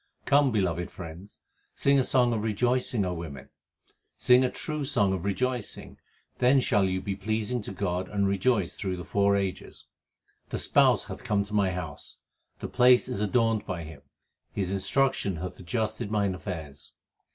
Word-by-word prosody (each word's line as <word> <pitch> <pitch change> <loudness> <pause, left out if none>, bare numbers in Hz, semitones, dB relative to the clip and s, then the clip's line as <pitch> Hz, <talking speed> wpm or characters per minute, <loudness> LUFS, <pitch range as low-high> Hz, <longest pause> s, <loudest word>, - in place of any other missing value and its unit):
Come, 140 -1 +4
beloved 90 -5 -1
friends, 90 +3 -10 0.3
Sing 140 0 +3
a - - +3
song 125 -2 +3
of 110 -2 -2
rejoicing, 120 0 +1
O 90 - -2
women. 85 -4 -8 0.7
Sing 125 +1 +5
a 130 - +2
true 150 +2 -4
song 105 -9 +2
of 95 -1 -4
rejoicing; 125 +3 -3 0.4
then 130 +2 +5
shall 105 -6 +2
you 95 0 0
be 95 +1 -4
pleasing 110 +4 -2
to 100 - -7
God 90 -1 -2
and 100 -1 0
rejoice 100 -1 +1
through 95 -2 -4
the 90 - -6
four 100 0 +2
ages. 95 -2 -4 0.6
2 - - -20
The - - 0
Spouse - - +4
hath - - -9
come 100 -1 +1
to 105 +1 -11
my 100 -2 +3
house, 90 0 -6 0.4
the - - -3
place 125 0 +5
is 125 -5 -3
adorned 115 0 +1
by 90 -4 -4
Him. 75 -2 -11 0.5
His 95 -2 -2
instruction 100 0 +1
hath 90 +3 -6
adjusted 110 +4 -3
mine 100 -3 +1
affairs. 80 -7 -8
100 Hz, 170 wpm, -27 LUFS, 95-125 Hz, 0.7 s, Sing